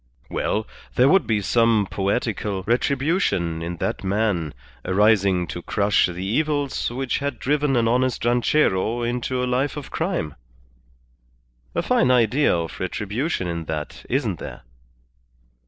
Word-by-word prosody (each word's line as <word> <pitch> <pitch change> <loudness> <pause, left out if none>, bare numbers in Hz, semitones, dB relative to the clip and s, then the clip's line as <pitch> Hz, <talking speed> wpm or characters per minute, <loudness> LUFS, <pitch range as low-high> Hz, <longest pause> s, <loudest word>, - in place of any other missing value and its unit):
Well, 110 +1 -1 0.3
there 125 - +5
would 190 +6 +4
be 110 -2 +1
some 115 0 +3
poetical 100 -1 -1
retribution 125 - 0
in 85 +1 -4
that - - -2
man 95 - 0 0.3
arising 100 -2 +3
to 85 - -5
crush 100 +3 +2
the 90 +1 -5
evils 145 +5 0
which 130 +2 -2
had 140 -3 -3
driven 145 +1 +1
an 115 -1 +2
honest 125 0 +1
ranchero 120 -2 +2
into 125 +1 -1
a - - +1
life 130 +4 0
of 145 - -7
crime. 165 - -2 1.4
A - - +1
fine 130 - +3
idea 125 +3 +3
of 85 -1 -5
retribution 105 - -2
in 85 -1 -3
that, 75 -1 -5
isn't 115 - 0
there?" - - -8
115 Hz, 135 wpm, -23 LUFS, 95-130 Hz, 1.4 s, there